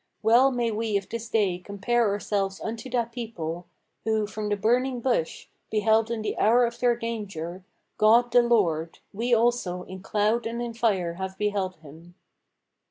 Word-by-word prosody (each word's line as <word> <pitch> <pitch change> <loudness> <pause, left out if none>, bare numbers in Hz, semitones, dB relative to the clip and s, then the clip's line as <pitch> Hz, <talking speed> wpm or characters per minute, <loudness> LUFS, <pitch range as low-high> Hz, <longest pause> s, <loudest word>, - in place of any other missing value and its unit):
Well 235 +5 +6
may 240 -3 -1
we 215 -1 0
of 195 - -6
this 230 0 -5
day 200 -6 +1
compare 205 +4 0
ourselves 200 -1 -1
unto 225 +3 -5
that 235 -2 -1
people 180 -8 -5 0.4
Who, 220 -1 +1
from 210 0 -5
the 205 - +1
burning 245 +4 +1
bush, 235 -10 -1 0.2
beheld 220 +1 +2
in 230 -2 -3
the - - -2
hour 240 +3 +5
of 235 0 -5
their 245 -1 +3
danger 195 -7 -5 0.4
God 235 +3 +5
the 245 +1 +6
Lord: 170 -9 +1 0.2
we 235 +5 -2
also 230 -6 +2
in 185 0 -9
cloud 215 +4 0
and 235 +1 -4
in 240 -1 -4
fire 200 -7 0
have 190 0 -4
beheld 200 -3 -1
him." 165 +3 -14
220 Hz, 165 wpm, -26 LUFS, 195-235 Hz, 0.4 s, Well